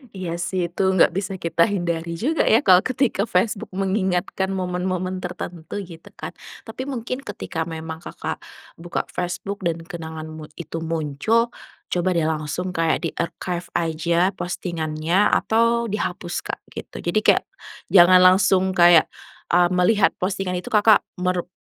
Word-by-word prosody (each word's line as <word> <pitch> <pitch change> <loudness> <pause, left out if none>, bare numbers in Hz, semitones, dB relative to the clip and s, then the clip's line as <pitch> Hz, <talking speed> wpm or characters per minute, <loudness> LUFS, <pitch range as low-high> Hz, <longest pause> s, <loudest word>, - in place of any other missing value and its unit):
Iya 185 -3 -4
sih 175 0 -2
itu 180 - -1
nggak 180 - +5
bisa 195 +2 -3
kita 170 -2 +2
hindari 170 -4 -2
juga 290 - 0
ya 230 +6 +5
kalau 185 -2 +7
ketika 240 -2 0
Facebook 195 +2 0
mengingatkan 190 -1 0
momen-momen 185 0 -2
tertentu 180 +1 -6
gitu 165 -3 -13
kan. - - -6 0.3
Tapi 255 +4 -7
mungkin 255 -1 -4
ketika 165 - -5
memang 160 -1 -6
Kakak - - -6 0.4
buka 175 +1 -3
Facebook 180 +3 -4
dan 165 0 -3
kenangan 160 -3 -7
mut 155 -1 -10
itu 165 -1 -6
muncul 165 +9 0 0.4
coba 180 +1 0
deh 165 -2 +2
langsung 160 +4 -2
kayak 165 0 +1
di-archive 170 +1 -3
aja 170 +2 +1
postingannya 170 0 -1
atau 230 +1 +2
dihapus 185 -4 -3
Kak - - -5
gitu - - -9
jadi 175 +5 0
kayak - - +4 0.4
jangan 185 -1 +7
langsung 185 0 +4
kayak, 175 -2 +7 0.5
eee, 175 0 +4
melihat 185 +3 +3
postingan 185 -1 -1
itu 180 - -11
Kakak 215 0 +5 0.2
merep 180 -1 -1
180 Hz, 140 wpm, -22 LUFS, 170-195 Hz, 0.5 s, kalau